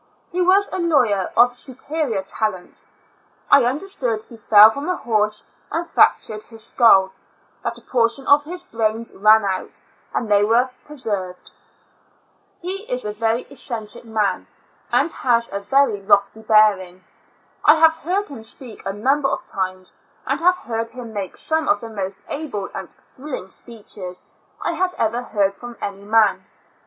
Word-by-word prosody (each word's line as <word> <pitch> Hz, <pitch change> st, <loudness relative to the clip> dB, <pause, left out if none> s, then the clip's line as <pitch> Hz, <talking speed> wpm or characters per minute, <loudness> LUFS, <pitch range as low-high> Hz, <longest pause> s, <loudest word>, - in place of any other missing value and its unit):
He 365 Hz, -, -1 dB
was 385 Hz, +3 st, +4 dB
a -, -, -4 dB
law^^er 245 Hz, -, +2 dB
of 245 Hz, +1 st, +6 dB
superior 260 Hz, -3 st, -3 dB
talents. 195 Hz, -2 st, -3 dB, 0.6 s
I 275 Hz, -, +7 dB
understood 250 Hz, -, -2 dB
he 230 Hz, -, -14 dB
fell 215 Hz, -1 st, +7 dB
from 280 Hz, +8 st, -5 dB
a 365 Hz, -, +1 dB
horse 215 Hz, -2 st, 0 dB, 0.3 s
and 335 Hz, +1 st, -1 dB
fractured 215 Hz, -9 st, +2 dB
his 225 Hz, 0 st, -5 dB
skull, 195 Hz, -6 st, +4 dB, 0.5 s
that -, -, -3 dB
a -, -, -14 dB
portion 235 Hz, +2 st, +1 dB
of 290 Hz, +1 st, +5 dB
his 355 Hz, +3 st, -6 dB
brains 225 Hz, -2 st, -2 dB
ran 215 Hz, +1 st, +5 dB
out, 190 Hz, -1 st, -3 dB, 0.3 s
and 235 Hz, -, -2 dB
they 205 Hz, 0 st, +5 dB
were 240 Hz, +4 st, +2 dB, 0.2 s
preserved. 205 Hz, -11 st, -4 dB, 1.1 s
He 390 Hz, +4 st, -5 dB
is 250 Hz, -1 st, -2 dB
a 210 Hz, -, -3 dB
very 225 Hz, +2 st, 0 dB
eccentric 230 Hz, -6 st, -6 dB
man, 215 Hz, -4 st, -1 dB, 0.4 s
and 270 Hz, +7 st, +2 dB
has 235 Hz, -4 st, +1 dB
a 200 Hz, -, -1 dB
very 220 Hz, 0 st, +2 dB
lofty 200 Hz, +2 st, +2 dB
bearing. 205 Hz, -4 st, +3 dB, 0.6 s
I 300 Hz, -, +7 dB
have 320 Hz, 0 st, +5 dB
heard 360 Hz, +5 st, -2 dB
him 250 Hz, -6 st, -9 dB
speak 230 Hz, 0 st, -6 dB
a 195 Hz, -, -2 dB
number 270 Hz, +7 st, +1 dB
of 275 Hz, -, -3 dB
times, 185 Hz, -1 st, -3 dB, 0.3 s
and -, -, -1 dB
have 360 Hz, +2 st, +3 dB
heard 230 Hz, -6 st, -4 dB
him 235 Hz, -2 st, -9 dB
make 195 Hz, -4 st, -5 dB
some 315 Hz, 0 st, 0 dB
of 305 Hz, -, +3 dB
the 230 Hz, -, -8 dB
most 195 Hz, -3 st, -5 dB
able 280 Hz, -10 st, -4 dB
and 190 Hz, -2 st, -7 dB
thrilling 260 Hz, -8 st, -9 dB
speeches 205 Hz, -6 st, -7 dB, 0.4 s
I -, -, 0 dB
have 370 Hz, -1 st, -1 dB
ever 230 Hz, +2 st, 0 dB
heard 200 Hz, -5 st, 0 dB
from 240 Hz, +2 st, -10 dB
any 200 Hz, 0 st, -5 dB
man. 220 Hz, +1 st, +3 dB
230 Hz, 160 wpm, -21 LUFS, 205-280 Hz, 1.1 s, I